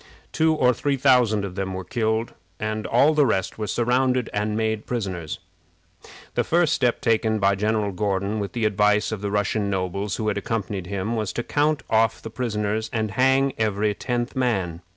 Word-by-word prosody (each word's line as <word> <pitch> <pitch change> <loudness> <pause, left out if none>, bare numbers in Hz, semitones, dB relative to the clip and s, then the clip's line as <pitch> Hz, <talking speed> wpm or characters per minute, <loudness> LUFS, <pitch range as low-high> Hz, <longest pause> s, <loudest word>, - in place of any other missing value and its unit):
Two 160 0 +2
or 125 -4 +3
three 140 +2 -1
thousand 125 -6 +3
of 95 - -6
them 95 0 -3
were 95 - -4
killed, 110 +4 -1 0.3
and 110 0 -3
all 140 +6 +4
the 150 -1 +4
rest 105 -5 -1
were 105 - -2
surrounded 125 +2 +1
and 105 +1 -1
made 110 -1 -1
prisoners. 95 -9 -3 1.0
The - - +1
first 170 -2 +2
step 125 -5 +1
taken 110 -1 +2
by 100 -1 +3
General 105 +1 0
Gordon, 100 +2 -1
with 100 -1 -4
the 115 -2 -1
advice 105 0 +2
of 110 -3 -4
the 100 - -2
Russian 105 0 0
nobles 95 +1 -2
who 110 - -3
had 100 -1 0
accompanied 100 -3 -3
him, 100 +4 -2
was 110 -3 -2
to 120 - -2
count 150 +2 +1
off 110 0 +2
the 110 - -8
prisoners 110 -2 -2
and 110 -4 -1
hang 135 +4 +3
every 105 -1 +1
tenth 120 +2 -3
man. 95 -10 -1
110 Hz, 185 wpm, -24 LUFS, 100-120 Hz, 1.0 s, all